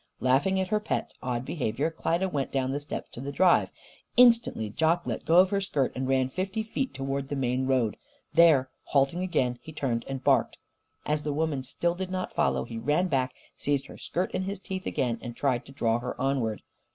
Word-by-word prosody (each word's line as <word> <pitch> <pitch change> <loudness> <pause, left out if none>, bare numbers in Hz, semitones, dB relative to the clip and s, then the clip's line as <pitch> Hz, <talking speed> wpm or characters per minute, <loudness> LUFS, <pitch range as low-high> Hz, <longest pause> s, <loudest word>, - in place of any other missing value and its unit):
Laughing 140 +10 +2
at 190 - -1
her 215 0 +2
pet's 210 - -3
odd 125 -1 -2
behaviour, 140 +1 -1
Klyda 170 +3 0
went 145 -7 -2
down 130 -1 0
the 140 - -1
steps 145 0 -6
to 120 - -8
the 140 +1 -4
drive. 180 +5 +4 0.5
Instantly 235 - +5
Jock 160 +10 +1
let - - -4
go 165 - +4
of 185 +1 +6
her 200 -1 +1
skirt 145 -9 0
and 130 0 -2
ran 130 -1 +2
fifty 190 +9 -3
feet 260 +4 -2
towards 135 0 -3
the 145 - -2
main 130 -1 0
road. 125 -5 +1 0.4
There, 150 -6 +5
halting 140 +5 +2
again, 125 -9 0
he 160 - -10
turned 130 -6 -1
and 135 -1 -5
barked. - - +3 0.5
As 150 0 0
the 150 - -2
woman 150 -2 0
still 170 +6 -1
did 185 +1 -4
not 185 0 -3
follow, - - +1
he 115 -1 -6
ran 150 +9 +1
back, 130 -3 0 0.2
seized 140 -1 -1
her - - -11
skirt 180 +2 -2
in - - -1
his 200 0 -4
teeth 190 -1 -5
again 120 -3 -1
and 120 -1 -7
tried 130 -3 0
to - - -11
draw 115 -4 +1
her 125 +1 -5
onward. 130 -5 0
140 Hz, 210 wpm, -28 LUFS, 130-175 Hz, 0.5 s, of